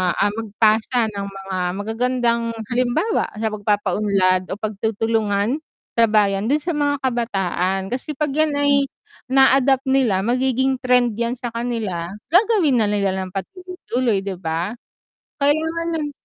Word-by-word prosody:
ah, 205 - +2
magpasa 220 +2 +1
ng 200 -1 -5
mga 195 -1 -6 0.2
magagandang 235 +3 0 0.3
halimbawa 255 - +1
sa 220 0 -2
pagpapaunlad 200 -3 +1
o - - -4
pagtutulungan 220 +3 -1 0.4
sa 230 0 +5
bayan, 205 -1 +2
dun 295 +4 +2
sa 345 - -1
mga 290 -1 +1
kabataan, 195 -6 0
kasi 265 +4 -4
‘pag 300 -2 0
‘yan 310 0 +1
ay 285 0 +3 0.5
na-adapt 265 0 +4
nila 235 -8 +2
magiging 260 +2 +1
trend 250 -2 +3
‘yan 235 +1 0
sa 240 - -4
kanila, 220 -8 -3 0.2
gagawin 360 - +4
na 215 - +2
nila 200 -2 +1
nang 190 -1 -3
patuloy-tuloy, 250 - -2
‘di 195 - -2
ba? 170 +4 -2 0.7
Kailangan 320 +4 +1
ng 295 -2 -3
230 Hz, 135 wpm, -21 LUFS, 200-265 Hz, 0.7 s, sa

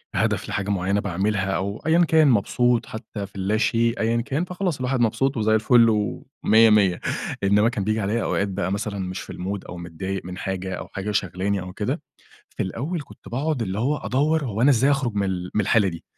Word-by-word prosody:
هدف - - 0
لحاجة 100 0 -2
معيّنة 100 0 +1
باعملها 100 +1 -1
أو 100 +2 -2
أيًّا 170 +2 +4
كان، 160 -1 +5
مبسوط 120 0 +2
حتى 110 -2 -7
في 100 - -27
اللاشيء 110 +4 +1
أيًّا 115 +1 +1
كان، 140 +8 -2
فخلاص 180 -3 -2
الواحد 130 0 0
مبسوط 130 +4 +1
وزي 110 0 +3
الفل 115 +2 +5
ومِيَّة 110 +1 +2
مِيَّة، 100 -4 +4 0.4
إنما 105 +3 +4
كان 115 -5 -3
بييجي 110 +2 0
عليَّ 105 +4 0
أوقات 100 - 0
بقى 95 -1 -2
مثلًا 100 0 -3
مش 95 -1 -4
في - - -9
الmood 95 +3 -4
أو 90 - -7
متضايق 85 +3 -5
من 90 0 -7
حاجة 95 -1 -4
أو - - -7
حاجة 100 +2 -4
شاغلاني 95 0 -1
أو 90 0 -8
كده، - - -2 0.5
في - - -4
الأول 145 - -3
كنت - - -15
باقعد 135 +2 -1
اللي 95 -2 -3
هو 135 +7 +1
أدوَّر 150 +4 0
هو 110 -3 -2
أنا 140 - +6
إزاي 135 +2 +4
اخرُج 135 -5 0
من 100 -1 0
ال 90 -1 -3
من - - +2
الحالة 105 0 +3
دي، 85 -2 -7
105 Hz, 205 wpm, -23 LUFS, 95-125 Hz, 0.5 s, أنا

